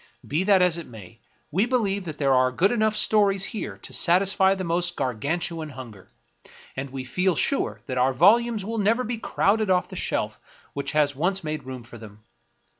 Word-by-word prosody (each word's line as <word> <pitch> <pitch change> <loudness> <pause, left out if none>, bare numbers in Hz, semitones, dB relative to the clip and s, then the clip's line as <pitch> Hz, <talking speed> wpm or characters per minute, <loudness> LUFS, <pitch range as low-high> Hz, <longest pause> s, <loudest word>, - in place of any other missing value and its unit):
Be 155 +6 -1
that 195 -2 +5
as 175 -2 +1
it 165 - -9
may, 110 -1 -13 0.3
we 195 +9 +1
believe 200 -6 0
that 155 -3 -6
there 135 -2 +2
are 130 0 +4
enough 130 - -14 0.4
good - - -4
stories 200 -3 +2
here 215 +2 -5
to - - -8
satisfy 190 +2 +3
the 190 - -4
most 175 0 -1
Gargantuan 155 +6 -2
hunger, 120 -8 -11 0.7
and 135 +1 -5
we 130 0 -6
feel 180 +8 0
sure 280 - 0
that 130 -2 -3
our 130 +2 +3
volumes 215 - +3
will 225 +1 -3
never 225 +5 +2
be 235 -1 -4
crowded 215 -1 +1
off 180 -1 +2
the - - -9
shelf - - -2 0.3
which 140 - -4
has 145 -2 +2
once 185 +6 -1
made 155 -3 -4
room 130 -2 -7
for 115 0 -13
them. 105 -1 -13
170 Hz, 190 wpm, -24 LUFS, 130-195 Hz, 0.7 s, that